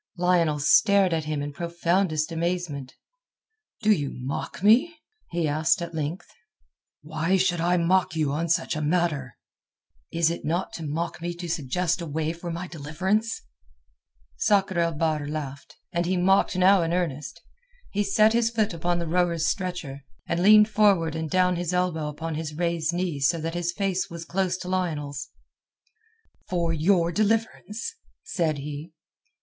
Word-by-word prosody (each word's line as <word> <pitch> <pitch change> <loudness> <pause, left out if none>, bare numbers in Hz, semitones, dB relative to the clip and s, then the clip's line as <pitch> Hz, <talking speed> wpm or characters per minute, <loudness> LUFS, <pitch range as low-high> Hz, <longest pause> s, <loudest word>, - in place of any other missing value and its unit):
Lionel 175 -4 +2
stared 190 +5 +4
at 160 -2 -1
him 150 -2 -2
in 145 0 -5
profoundest 170 0 0
amazement. 165 -5 -3 0.9
"Do 215 - +5
you 145 -9 +1
mock 135 +7 -5
me?" 255 +11 +5 0.3
he 170 -2 -1
asked 155 +2 +2
at 170 -1 -5
length. 155 +3 -3 0.8
"Why 160 +5 0
should 180 -2 +1
I 175 +1 +2
mock 175 0 +2
you 155 -3 +1
on 165 +4 -2
such 165 -1 +1
a 155 - -2
matter?" 150 -5 0 0.7
"Is 165 -1 +2
it 170 - -5
not 170 +5 -2
to 165 - -6
mock 160 +3 -3
me 175 0 -3
to 175 0 -6
suggest 165 +3 -1
a 170 - -5
way 155 +2 -2
for 170 +1 -7
my 170 +2 -4
deliverance?" 185 +9 -2 0.9
Sakr 195 -3 +2
el 170 -1 +1
Bahr 155 -1 -1
laughed, 145 -2 -6 0.2
and 170 0 0
he 185 +1 +1
mocked 190 +2 +3
now 185 +1 +5
in 165 0 -1
earnest. 160 -4 -2 0.5
He 205 +1 0
set 215 +2 +4
his 235 0 +3
left 215 -2 +2
foot - - -6
upon 175 +1 0
the 170 -1 -3
rowers' 170 -1 +1
stretcher, 170 -8 -3 0.2
and 170 +1 -1
leaned 210 +2 +7
forward 200 -7 +3
and 160 -1 -3
down 180 0 +2
his 175 +1 -2
elbow 175 -4 0
upon 160 +2 -5
his 155 -1 -4
raised 170 -1 0
knee 175 -4 -2
so 165 +5 +2
that 165 +1 -3
his 175 0 -1
face 190 0 -1
was 170 0 -7
close 185 +1 -1
to 180 - -8
Lionel's. 155 -7 -2 1.2
"For 170 -2 0
your 170 +1 +2
deliverance?" 220 - -1 0.3
said 160 -5 -1
he. 150 +3 -7
170 Hz, 165 wpm, -25 LUFS, 155-185 Hz, 1.2 s, leaned